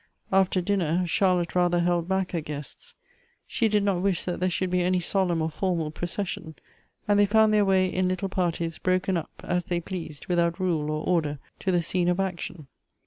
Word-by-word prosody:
After 190 -1 +3
dinner, 180 -2 +1
Charlotte 180 -1 +1
rather 175 -1 +2
held 175 -1 +1
back 190 0 0
her 170 - -1
guests. 150 -1 -8 0.5
She 230 - +1
did 210 -1 +2
not 195 -3 +1
wish 190 -3 +1
that 180 - -3
there 185 +1 +1
should 180 +1 -1
be 180 0 +2
any 180 +1 +2
solemn 175 -2 +1
or 160 - 0
foiTnal 165 -2 -2
procession, 175 -2 -4 0.5
and 205 0 +4
they 205 - +5
found 220 +1 +4
their 210 -1 +4
way 190 -1 +3
in 185 0 0
little 185 +1 -1
parties, 170 -3 -1
broken 185 +1 +1
up, 165 - -3
as 175 0 -1
they 175 -1 -1
pleased, 165 -4 -7
without 170 0 +1
rule 165 -5 0
or 155 0 -2
order, 155 -5 +1 0.2
to 190 - 0
the 175 -2 +2
scene 175 +1 +1
of 180 +1 +1
action. 175 -4 -3
180 Hz, 195 wpm, -26 LUFS, 170-190 Hz, 0.5 s, they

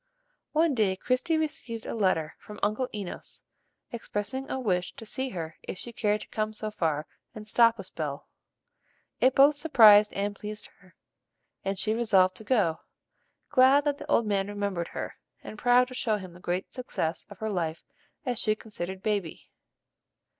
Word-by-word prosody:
One 315 0 +3
day 210 -6 +2
Christie 255 - 0
received 250 -7 -4
a - - -4
letter 185 -8 +1
from 210 - -11
Uncle 215 +5 0
Enos 200 -4 -7 0.5
expressing 235 +3 -4
a 265 - -2
wish 180 -7 0
to 225 - -9
see 260 +4 -2
her 165 -6 -6
if - - -6
she 235 +5 -8
cared 210 -1 0
to - - -9
come 215 -1 -2
so 215 0 -4
far 155 -6 -1 0.3
and 215 -1 -9
"stop 230 +1 +5
a - - -6
spell." - - -5 0.9
It 260 0 +4
both 285 +2 +7
surprised 215 -9 +7
and 205 +1 -2
pleased 210 +1 -6
her, 185 -1 -22 0.7
and 195 0 -2
she 215 +3 0
resolved 195 -5 +3
to - - -9
go, 205 -9 +2 0.7
glad 275 +1 +6
that 285 -1 0
the - - -9
old 230 - +3
man 200 -2 0
remembered 200 -4 -2
her, - - -6 0.3
and - - -8
proud 245 +1 +5
to - - -9
show 220 -4 0
him 185 -3 -9
the 175 - -14
great 180 +1 -3
success 165 -10 -3
of 205 - -11
her 220 +1 -3
life, 165 -4 -2 0.4
as 245 -3 -1
she 215 -1 +2
considered 190 -3 -7
Baby. 200 -6 -2
210 Hz, 175 wpm, -28 LUFS, 190-245 Hz, 0.9 s, both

